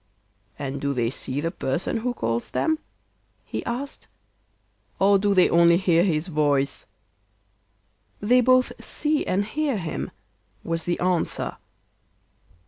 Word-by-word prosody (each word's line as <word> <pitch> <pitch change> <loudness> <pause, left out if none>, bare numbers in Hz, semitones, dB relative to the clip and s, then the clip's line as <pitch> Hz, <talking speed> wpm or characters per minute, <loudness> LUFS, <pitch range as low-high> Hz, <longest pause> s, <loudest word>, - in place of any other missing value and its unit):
'And 140 -1 -4
do 140 -1 -1
they 120 -1 0
see 135 +1 -3
the 165 +2 -1
person 170 - -1
who 245 +2 -2
calls 115 - -2
them,' 315 -1 0 0.7
he - - -4
asked, 265 +4 -5 0.9
'or 195 +1 +4
do 200 0 +2
they 185 - +6
only 170 0 +5
hear 175 -2 +3
his 165 -3 0
voice?' 145 -4 0 1.3
'They 245 +5 +4
both 255 +1 +4
see 300 0 0
and 200 +2 +1
hear 285 +2 -1
him,' 165 -4 -4 0.5
was 165 -1 -1
the 175 - -1
answer. 180 -2 0
175 Hz, 130 wpm, -24 LUFS, 150-230 Hz, 1.3 s, they